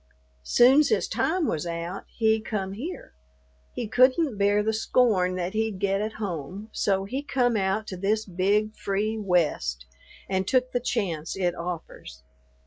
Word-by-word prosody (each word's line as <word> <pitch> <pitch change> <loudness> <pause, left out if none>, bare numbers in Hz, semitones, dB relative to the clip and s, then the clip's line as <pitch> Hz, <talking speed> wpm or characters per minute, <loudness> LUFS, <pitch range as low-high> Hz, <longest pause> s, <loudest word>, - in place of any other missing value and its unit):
"Soon's 260 - +5
his 445 - +1
time 340 0 0
was 165 - -2
out, 170 +3 -5
he 220 -1 +1
come 195 -3 -3
here; 290 - -7 0.6
he 235 - -4
couldn't 255 +4 +3
bear 205 +1 +3
the 220 +1 0
scorn 215 -5 +2
that 180 0 -3
he'd 220 -2 -1
get 195 +1 0
at 215 +1 -3
home, 195 0 -5
so 195 -1 0
he 260 +8 -3
come 250 -5 +1
out 195 +1 0
to 185 - -6
this 210 +4 0
big, 205 +4 0
free 210 +3 -2
West, 150 - 0 0.4
and 190 -1 -1
took 255 -1 +2
the 245 - 0
chance 175 -11 -2
it 180 -2 0
offers. 170 - -7
205 Hz, 155 wpm, -26 LUFS, 180-225 Hz, 0.6 s, Soon's